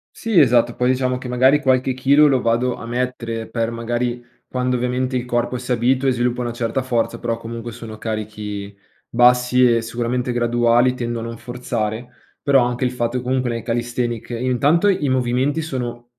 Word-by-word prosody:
Sì, 225 Hz, -6 st, +2 dB
esatto. 120 Hz, -3 st, +4 dB
Poi, 125 Hz, 0 st, +1 dB
diciamo 130 Hz, 0 st, +1 dB
che 130 Hz, -, -7 dB
magari 130 Hz, +4 st, +3 dB
qualche 130 Hz, -1 st, +2 dB
chilo 140 Hz, +4 st, +4 dB
lo 135 Hz, -3 st, +2 dB
vado 120 Hz, +2 st, +1 dB
a -, -, -9 dB
mettere 120 Hz, -2 st, -3 dB
per, 115 Hz, -1 st, -1 dB
magari, 120 Hz, +1 st, -2 dB, 0.2 s
quando 125 Hz, 0 st, -1 dB
ovviamente 125 Hz, +1 st, -1 dB
il 125 Hz, -1 st, -1 dB
corpo 120 Hz, 0 st, -1 dB
si 125 Hz, +1 st, -6 dB
abitua 125 Hz, +3 st, +2 dB
e -, -, +3 dB
sviluppa 125 Hz, 0 st, 0 dB
una 120 Hz, -1 st, -3 dB
certa 120 Hz, +2 st, -2 dB
forza, 120 Hz, -2 st, -1 dB
però 115 Hz, 0 st, -2 dB
comunque 115 Hz, 0 st, -7 dB
sono 110 Hz, -1 st, -9 dB
carichi 105 Hz, -2 st, -5 dB, 0.3 s
bassi 125 Hz, 0 st, +4 dB
e 115 Hz, -, +1 dB
sicuramente 120 Hz, +2 st, -2 dB
graduali. 120 Hz, +1 st, +2 dB
Tendo 120 Hz, -1 st, -3 dB
a -, -, -5 dB
non 115 Hz, -1 st, -6 dB
forzare, 115 Hz, -1 st, -4 dB, 0.3 s
però 135 Hz, -3 st, +4 dB
anche 120 Hz, +1 st, -2 dB
il 125 Hz, -, 0 dB
fatto 125 Hz, 0 st, -2 dB
comunque 125 Hz, 0 st, -1 dB
nei 115 Hz, -1 st, -3 dB
calisthenics 120 Hz, -1 st, -2 dB
intanto 130 Hz, -, +2 dB
i 185 Hz, -7 st, +1 dB
movimenti 130 Hz, +4 st, +1 dB
sono 120 Hz, -5 st, -5 dB
120 Hz, 180 wpm, -20 LUFS, 115-125 Hz, 0.3 s, esatto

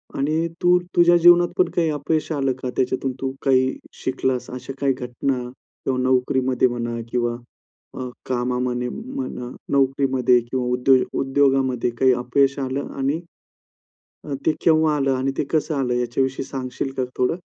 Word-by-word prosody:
आणि 155 Hz, +4 st, 0 dB
तू 180 Hz, 0 st, +5 dB, 0.2 s
तुझ्या 175 Hz, 0 st, +6 dB
जीवनात 175 Hz, +1 st, +6 dB
पण 180 Hz, -2 st, +3 dB
काही 165 Hz, -2 st, +2 dB
अपयश 155 Hz, +2 st, -1 dB
आलं 135 Hz, -3 st, 0 dB
का? 130 Hz, -, -3 dB
त्याच्यातून 130 Hz, +1 st, 0 dB
तू 135 Hz, -1 st, -1 dB
काही 130 Hz, -1 st, +3 dB, 0.3 s
शिकलास. 130 Hz, -1 st, -1 dB
अशा 125 Hz, +1 st, -7 dB
काही 140 Hz, -1 st, +2 dB
घटना 125 Hz, +1 st, -2 dB
किंवा 130 Hz, +1 st, -5 dB
नोकरीमध्ये 130 Hz, 0 st, +2 dB
म्हणा 120 Hz, -1 st, -3 dB
किंवा 120 Hz, -1 st, 0 dB, 0.6 s
अ, 130 Hz, -1 st, -4 dB, 0.2 s
कामामध्ये 125 Hz, 0 st, -1 dB
म्हणा, 240 Hz, -, -6 dB, 0.2 s
नोकरीमध्ये 135 Hz, -2 st, +3 dB
किंवा 130 Hz, -1 st, -1 dB
उद्योग 125 Hz, +1 st, +2 dB
उद्योगामध्ये 135 Hz, -2 st, +2 dB
काही 130 Hz, -1 st, +5 dB
अपयश 135 Hz, +3 st, +1 dB
आलं 135 Hz, +1 st, -3 dB
आणि 140 Hz, +4 st, 0 dB, 1.1 s
अ, 145 Hz, -, -4 dB
ते 160 Hz, -, +5 dB
केव्हा 155 Hz, -2 st, +4 dB
आलं? 135 Hz, -1 st, +1 dB
आणि 130 Hz, +1 st, -1 dB
ते -, -, +1 dB
कसं 155 Hz, 0 st, 0 dB
आलं? 125 Hz, -3 st, 0 dB
याच्याविषयी 130 Hz, +2 st, -1 dB
सांगशील 130 Hz, 0 st, -4 dB
का 130 Hz, -, 0 dB
थोडं? 125 Hz, +6 st, +1 dB
130 Hz, 145 wpm, -22 LUFS, 125-140 Hz, 1.1 s, तुझ्या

